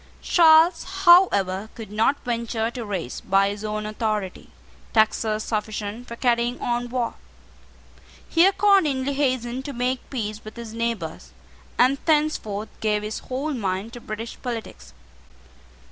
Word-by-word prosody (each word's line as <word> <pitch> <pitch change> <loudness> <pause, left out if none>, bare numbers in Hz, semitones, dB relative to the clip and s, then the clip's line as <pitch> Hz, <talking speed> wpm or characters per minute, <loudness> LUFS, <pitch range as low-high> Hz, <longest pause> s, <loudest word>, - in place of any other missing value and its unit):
Charles, 330 0 +5 0.2
however, 215 - +5
could 220 -4 -9
not 220 +7 +2
venture 235 -1 -2
to 240 -1 -6
raise, 190 - -4
by 195 +1 +2
his 205 +1 -6
own 215 0 -3
authority, 215 -3 -3 0.4
taxes 220 -1 +2
sufficient 215 +1 -4
for 235 - -7
carrying 240 0 +1
on 240 0 -2
war. 240 -2 -1 1.1
He 335 +3 +5
accordingly 340 -10 +3
hastened 260 -2 -1
to 285 - -5
make 250 +1 -2
peace 215 -4 -4
with 215 - -10
his 230 -2 -8
neighbours, 230 0 -4 0.4
and 260 +3 +4
thenceforth 295 -10 0
gave 210 -1 0
his 215 +1 -4
whole 275 +4 -3
mind 200 -1 -3
to 240 - -9
British 225 +1 -7
politics. 225 - -7
235 Hz, 130 wpm, -24 LUFS, 215-260 Hz, 1.1 s, Charles